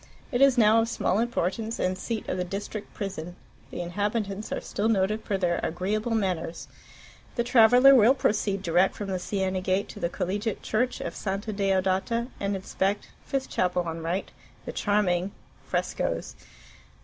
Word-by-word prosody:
It 245 0 0
is 275 -2 +6
now 225 0 +6
of 225 - -1
small 210 -3 0
importance, 225 -1 -1
and 185 0 0
seat 220 +3 -4
of - - -1
the 180 - 0
district 200 +3 -5
prison. 180 -4 -5 0.3
The - - -5
inhabitants 205 +3 -2
are - - -1
still 210 +2 -1
noted 215 +1 +1
for 200 - -1
their 175 -2 +1
agreeable 210 +7 -1
manners. 180 -5 -2 0.7
The 235 - +1
traveller 245 +3 +7
will 250 +1 +6
proceed 205 -5 0
direct 175 +2 +3
from 205 -2 -5
the 185 -1 -1
Siena 190 0 -1
gate 190 +2 0
to - - -9
the 170 - 0
Collegiate 200 +4 -2
Church 245 +4 0
of 170 - -4
Santa 200 +2 -3
Deodata, 195 +4 +1
and 200 0 -1
inspect 195 +1 -2 0.2
(5th 270 -1 0
chapel 180 -1 0
on 165 -1 -5
right) 170 +4 -2 0.3
the - - -4
charming 200 -3 +1 0.3
Frescoes.... - - -2
200 Hz, 160 wpm, -27 LUFS, 185-220 Hz, 0.7 s, traveller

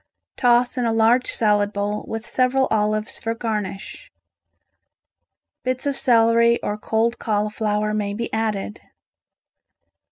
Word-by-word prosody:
Toss 245 0 +2
in 245 - 0
a - - +1
large 225 +3 +3
salad 210 -2 +2
bowl 205 0 -3
with 225 +1 -5
several 260 +1 +1
olives 215 0 0
for 225 0 -3
garnish. 215 - -5 1.5
Bits 255 +1 -2
of 280 -1 0
celery 235 -1 +3
or 205 - -2
cold 225 +2 -1
cauliflower 210 0 -1
may 205 -1 -2
be 235 +2 -5
added. 215 -2 -2
225 Hz, 120 wpm, -22 LUFS, 210-235 Hz, 1.5 s, large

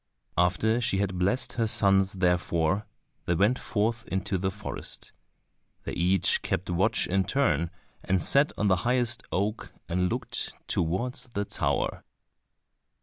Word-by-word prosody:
After 95 +7 +2
she 105 -4 +1
had 95 -2 -1
blessed 120 +8 +1
her 115 -3 0
sons 95 -2 +3
therefore, 90 0 +1 0.4
they 85 - +2
went 105 +9 +3
forth 115 +2 -1
into 95 0 -1
the 95 +1 0
forest. 105 +2 -7 0.7
They - - -4
each 90 +1 +2
kept 90 +1 -2
watch 100 +5 +2
in 95 +1 +1
turn, 85 - +1 0.3
and 95 0 +1
sat 140 - +4
on 105 - +1
the 95 -2 +4
highest 120 +2 +1
oak 105 +4 -2 0.2
and 90 +1 +1
looked - - -3
towards 95 +11 -1
the 100 0 0
tower. - - -1
95 Hz, 140 wpm, -28 LUFS, 90-110 Hz, 0.7 s, sat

